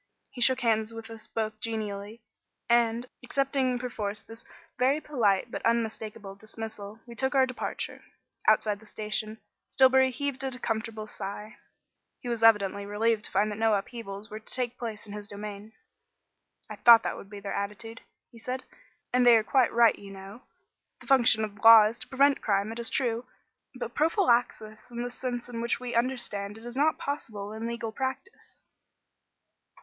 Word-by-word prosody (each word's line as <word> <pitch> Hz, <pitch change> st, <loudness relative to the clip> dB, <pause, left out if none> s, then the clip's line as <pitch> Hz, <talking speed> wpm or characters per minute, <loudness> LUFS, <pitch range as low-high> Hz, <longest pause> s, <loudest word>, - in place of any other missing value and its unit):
He 245 Hz, -, -9 dB
shook 260 Hz, +1 st, +4 dB
hands 220 Hz, -2 st, +1 dB
with 225 Hz, 0 st, -9 dB
us 225 Hz, -1 st, -9 dB
both 215 Hz, 0 st, -3 dB
genially, 215 Hz, -1 st, -4 dB, 0.5 s
and, 235 Hz, 0 st, +2 dB, 0.2 s
accepting 265 Hz, -1 st, 0 dB
perforce 215 Hz, -4 st, -4 dB
this 225 Hz, 0 st, -12 dB, 0.4 s
very 265 Hz, +4 st, +3 dB
polite 230 Hz, -8 st, +1 dB
but -, -, -5 dB
unmistakable 220 Hz, -3 st, -2 dB
dismissal, 215 Hz, 0 st, -8 dB
we 240 Hz, -, -10 dB
took 265 Hz, +4 st, -1 dB
our 265 Hz, -1 st, +6 dB
departure. 255 Hz, -1 st, -5 dB, 0.4 s
Outside 215 Hz, -1 st, +3 dB
the 220 Hz, -, -17 dB
station, 215 Hz, +1 st, -2 dB, 0.3 s
Stillbury 265 Hz, 0 st, +5 dB
heaved 270 Hz, +1 st, -3 dB
a 260 Hz, -2 st, -3 dB
comfortable 220 Hz, -2 st, -3 dB
sigh. 210 Hz, +1 st, -7 dB, 0.6 s
He 250 Hz, -, -9 dB
was 235 Hz, -2 st, -2 dB
evidently 200 Hz, -3 st, +4 dB
relieved 210 Hz, +1 st, 0 dB
to -, -, -6 dB
find 205 Hz, +2 st, +2 dB
that 210 Hz, -, -6 dB
no 225 Hz, -1 st, +3 dB
upheavals 205 Hz, -1 st, -6 dB
were 215 Hz, -, -6 dB
to 220 Hz, -, -12 dB
take 250 Hz, -1 st, -2 dB
place 225 Hz, -3 st, -5 dB
in 205 Hz, -, -10 dB
his 205 Hz, -1 st, -7 dB
domain. 205 Hz, +1 st, -8 dB, 1.0 s
"I -, -, -8 dB
thought 235 Hz, -1 st, +8 dB
that -, -, -2 dB
would 195 Hz, -, -11 dB
be 205 Hz, -1 st, -8 dB
their 200 Hz, 0 st, -5 dB
attitude," 210 Hz, +3 st, -5 dB, 0.3 s
he 230 Hz, -, -14 dB
said, 255 Hz, +3 st, -4 dB, 0.5 s
"and 250 Hz, 0 st, +4 dB
they 240 Hz, -1 st, +8 dB
are 220 Hz, -, +1 dB
quite 255 Hz, +3 st, +3 dB
right, 235 Hz, -1 st, +4 dB
you 200 Hz, -, -11 dB
know. 195 Hz, +4 st, -10 dB, 0.6 s
The -, -, -15 dB
function 240 Hz, -5 st, +5 dB
of 205 Hz, -2 st, -12 dB
law 225 Hz, -1 st, +10 dB
is 225 Hz, +3 st, -2 dB
to -, -, -5 dB
prevent 280 Hz, +1 st, +3 dB
crime, 200 Hz, 0 st, 0 dB
it 230 Hz, -, -6 dB
is 235 Hz, -, 0 dB
true; 240 Hz, -1 st, -1 dB, 0.5 s
but 240 Hz, -2 st, -5 dB
prophylaxis 245 Hz, -, +1 dB
in 240 Hz, 0 st, -4 dB
the 245 Hz, -, -4 dB
sense 245 Hz, -1 st, -4 dB
in 235 Hz, -2 st, -5 dB
which 235 Hz, 0 st, 0 dB
we 245 Hz, -1 st, -5 dB
understand 230 Hz, -4 st, -2 dB
it 225 Hz, -, -13 dB
is 240 Hz, 0 st, -7 dB
not 300 Hz, +3 st, +2 dB
possible 215 Hz, -8 st, -5 dB
in 220 Hz, +1 st, -4 dB
legal 235 Hz, -1 st, -4 dB
practice." 265 Hz, -, -6 dB
225 Hz, 175 wpm, -28 LUFS, 210-245 Hz, 1.0 s, law